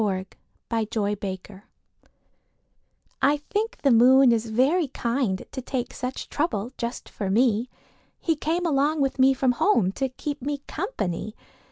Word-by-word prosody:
II 190 Hz, -3 st, 0 dB, 0.5 s
The 225 Hz, -2 st, 0 dB
Kind 210 Hz, -2 st, -1 dB, 0.3 s
Moon 195 Hz, -2 st, -13 dB, 1.6 s
I 290 Hz, +2 st, +4 dB
think 430 Hz, +9 st, -3 dB
the 275 Hz, -, +5 dB
moon 255 Hz, +2 st, +7 dB
is 230 Hz, -1 st, +1 dB
very 280 Hz, +9 st, +2 dB
kind 235 Hz, -6 st, -1 dB
To 260 Hz, -, -5 dB
take 250 Hz, 0 st, -3 dB
such 255 Hz, 0 st, -5 dB
trouble 245 Hz, -, -2 dB
just 235 Hz, 0 st, -5 dB
for 200 Hz, -3 st, -4 dB
me. 230 Hz, +2 st, +2 dB, 0.5 s
He 325 Hz, -, +1 dB
came 330 Hz, +4 st, -1 dB
along 295 Hz, 0 st, +2 dB
with 270 Hz, -1 st, 0 dB
me 265 Hz, +1 st, +5 dB
from 260 Hz, -1 st, +2 dB
home 235 Hz, -, +2 dB
To 265 Hz, +6 st, -2 dB
keep 285 Hz, +3 st, -5 dB
me 285 Hz, +1 st, -3 dB
company. 215 Hz, -, -3 dB
255 Hz, 150 wpm, -25 LUFS, 220-285 Hz, 1.6 s, moon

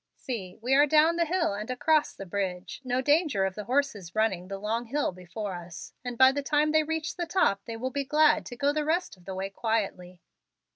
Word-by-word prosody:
"See, 195 Hz, -8 st, -6 dB
we 255 Hz, +2 st, +1 dB
are 290 Hz, +2 st, +6 dB
down 315 Hz, +3 st, +4 dB
the 340 Hz, -, +2 dB
hill 340 Hz, -, +1 dB
and 210 Hz, +4 st, -5 dB
across 300 Hz, +4 st, +2 dB
the 195 Hz, -, -8 dB
bridge. 190 Hz, +3 st, -4 dB
No 255 Hz, 0 st, 0 dB
danger 290 Hz, -, +2 dB
of 190 Hz, -, -2 dB
the 210 Hz, +1 st, -7 dB
horses 240 Hz, -8 st, -1 dB
running 210 Hz, -5 st, +1 dB
up -, -, -15 dB
the 195 Hz, -, -4 dB
long 220 Hz, +4 st, -2 dB
hill 280 Hz, +2 st, -1 dB
before 185 Hz, +3 st, -6 dB
us, 175 Hz, -1 st, -9 dB
and 245 Hz, -1 st, -5 dB
by 260 Hz, +1 st, +7 dB
the 285 Hz, +1 st, -2 dB
time 295 Hz, +2 st, +2 dB
they 315 Hz, 0 st, +4 dB
reach 320 Hz, +1 st, -3 dB
the 345 Hz, -1 st, -2 dB
top 325 Hz, -, +2 dB
they 230 Hz, -1 st, -6 dB
will 255 Hz, +3 st, -3 dB
be 280 Hz, +1 st, -1 dB
glad 300 Hz, +3 st, +4 dB
to 245 Hz, -, -7 dB
go 280 Hz, +3 st, +1 dB
the 305 Hz, 0 st, 0 dB
rest 330 Hz, 0 st, -1 dB
of 180 Hz, -2 st, -22 dB
the 190 Hz, -, -5 dB
way 195 Hz, +1 st, -4 dB
quietly." 195 Hz, -5 st, -2 dB
245 Hz, 235 wpm, -28 LUFS, 195-295 Hz, -, by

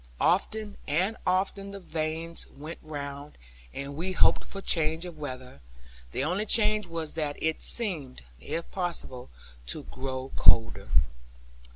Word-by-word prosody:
Often 205 Hz, +3 st, +2 dB
and 185 Hz, +9 st, +2 dB
often 195 Hz, +2 st, +1 dB
the 200 Hz, 0 st, -7 dB
vanes 165 Hz, -1 st, -2 dB
went 155 Hz, +4 st, -8 dB
round, 145 Hz, -1 st, -6 dB, 0.3 s
and 140 Hz, -, -5 dB
we 180 Hz, +5 st, -1 dB
hoped -, -, +5 dB
for 195 Hz, -, -7 dB
change 160 Hz, -2 st, +2 dB
of 170 Hz, -3 st, -8 dB
weather; 130 Hz, -, -6 dB, 0.5 s
the 130 Hz, -, -1 dB
only 185 Hz, +8 st, 0 dB
change 215 Hz, -3 st, +4 dB
was 165 Hz, -2 st, -4 dB
that 150 Hz, -3 st, -1 dB
it 160 Hz, 0 st, 0 dB
seemed 160 Hz, -, +1 dB, 0.2 s
(if 165 Hz, -, -4 dB
possible) 170 Hz, -9 st, -2 dB, 0.4 s
to -, -, -2 dB
grow 130 Hz, -, -5 dB
colder. 115 Hz, 0 st, +5 dB
160 Hz, 135 wpm, -29 LUFS, 140-185 Hz, 0.5 s, hoped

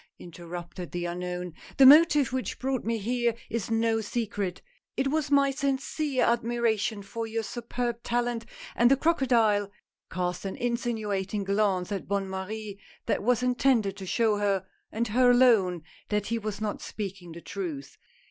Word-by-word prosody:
" -, -, -65 dB
interrupted 175 Hz, +1 st, -8 dB
the 175 Hz, 0 st, -3 dB
unknown, 180 Hz, 0 st, -4 dB
" -, -, -18 dB
the 270 Hz, -, +8 dB
motive 295 Hz, -2 st, +7 dB
which 260 Hz, -1 st, -2 dB
brought 260 Hz, -1 st, -2 dB
me 230 Hz, 0 st, -1 dB
here 235 Hz, +2 st, 0 dB, 0.2 s
is 230 Hz, -2 st, -2 dB
no 225 Hz, 0 st, +1 dB
secret 205 Hz, -4 st, -3 dB, 0.2 s
— -, -, -60 dB
It 270 Hz, +1 st, +1 dB
was 300 Hz, 0 st, 0 dB
my 280 Hz, -1 st, +4 dB
sincere 275 Hz, 0 st, -1 dB
admiration 230 Hz, -3 st, 0 dB
for 225 Hz, +3 st, -5 dB
your 225 Hz, 0 st, -2 dB
superb 240 Hz, +1 st, -4 dB
talent," 240 Hz, -1 st, -1 dB, 0.3 s
and 240 Hz, 0 st, +5 dB
the 275 Hz, -, +5 dB
crocodile 235 Hz, -10 st, +2 dB, 0.4 s
cast 180 Hz, -1 st, -3 dB
an 195 Hz, -, -4 dB
insinuating 215 Hz, -5 st, -2 dB
glance 195 Hz, -2 st, 0 dB
at 200 Hz, -, -4 dB
Bonne 200 Hz, -1 st, -1 dB
Marie, 200 Hz, +2 st, -5 dB, 0.3 s
that -, -, 0 dB
was 245 Hz, +2 st, +2 dB
intended 245 Hz, -5 st, +2 dB
to 190 Hz, -2 st, -7 dB
show 220 Hz, +1 st, +2 dB
her, 200 Hz, -2 st, 0 dB, 0.3 s
and 230 Hz, +1 st, -2 dB
her 250 Hz, +3 st, +4 dB
alone, 220 Hz, -9 st, +4 dB, 0.3 s
that 210 Hz, -1 st, 0 dB
he 230 Hz, +2 st, -1 dB
was 210 Hz, -2 st, -4 dB
not 215 Hz, -1 st, -3 dB
speaking 190 Hz, -5 st, -6 dB
the 170 Hz, -, -9 dB
truth. 160 Hz, -10 st, -6 dB
220 Hz, 165 wpm, -27 LUFS, 195-245 Hz, 0.4 s, the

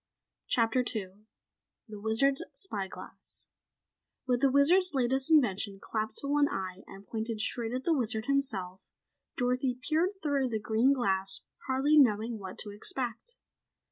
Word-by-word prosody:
CHAPTER 230 Hz, +1 st, +2 dB
2 200 Hz, -6 st, -2 dB, 0.7 s
The 210 Hz, -2 st, -9 dB
Wizard's 245 Hz, +6 st, +2 dB
Spy 210 Hz, -, -3 dB
Glass -, -, -10 dB, 0.8 s
With 250 Hz, -1 st, +1 dB
the 275 Hz, -, +5 dB
Wizard's 315 Hz, +6 st, +4 dB
latest 265 Hz, +2 st, +1 dB
invention 210 Hz, -, +3 dB
clapped 215 Hz, +1 st, -3 dB
to 280 Hz, -, -4 dB
one 285 Hz, 0 st, +3 dB
eye 185 Hz, 0 st, -4 dB
and 195 Hz, +1 st, -12 dB
pointed 220 Hz, +2 st, -4 dB
straight 225 Hz, +1 st, -1 dB
at 255 Hz, +1 st, -3 dB
the 335 Hz, -, +2 dB
Wizard 220 Hz, -5 st, -1 dB
himself, 215 Hz, -10 st, -1 dB, 0.6 s
Dorothy 250 Hz, 0 st, 0 dB
peered 335 Hz, +8 st, 0 dB
through 280 Hz, -4 st, +1 dB
the 220 Hz, -2 st, -1 dB
green 220 Hz, +5 st, +2 dB
glass 195 Hz, -7 st, 0 dB, 0.3 s
hardly 275 Hz, +3 st, +4 dB
knowing 225 Hz, -3 st, +3 dB
what 190 Hz, -2 st, -8 dB
to 205 Hz, -, -8 dB
expect. 240 Hz, -, -5 dB
245 Hz, 140 wpm, -30 LUFS, 215-275 Hz, 0.8 s, the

